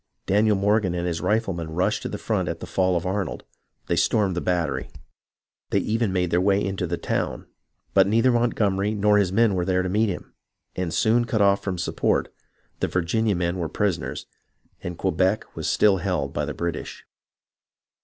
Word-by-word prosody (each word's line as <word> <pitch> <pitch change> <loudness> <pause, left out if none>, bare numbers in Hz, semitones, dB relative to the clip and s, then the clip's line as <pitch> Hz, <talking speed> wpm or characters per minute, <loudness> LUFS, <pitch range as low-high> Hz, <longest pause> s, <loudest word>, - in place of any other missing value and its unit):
Daniel 105 +2 +3
Morgan 100 -2 +1
and 85 0 -2
his 85 -2 -2
riflemen 95 -7 -1
rushed 90 - +1
to - - -4
the - - -4
front - - -1
at - - -4
the - - -6
fall 95 -1 +1
of 85 - -4
Arnold. 95 +1 -2 0.4
They - - 0
stormed 100 -5 +2
the 90 - -1
battery. 85 -7 -1 0.8
They - - +1
even 115 -1 0
made 90 -2 0
their 90 - +3
way 100 +1 +3
into 95 -2 -2
the 85 +1 -2
town; - - -2 0.5
but 95 -1 +5
neither 115 +5 +3
Montgomery 105 -4 +1
nor 105 0 +4
his 95 -3 +1
men 110 +1 +3
were 90 -2 0
there 90 0 +1
to 95 - -2
meet 105 +3 +2
him, 90 - -6 0.4
and 90 -2 -2
soon 120 +4 +2
cut 110 -1 -1
off 100 0 +3
from 95 -2 -2
support, 85 - 0 0.5
the - - 0
Virginia 100 +4 0
men 90 +1 -1
were 85 -2 -2
prisoners, 100 -4 -2 0.6
and 85 -1 -5
Quebec 95 +3 0
was - - -2
still 105 -2 +4
held 90 -7 -2
by 75 -1 -1
the 75 - -5
British. 85 -2 -5
95 Hz, 185 wpm, -24 LUFS, 90-105 Hz, 0.8 s, but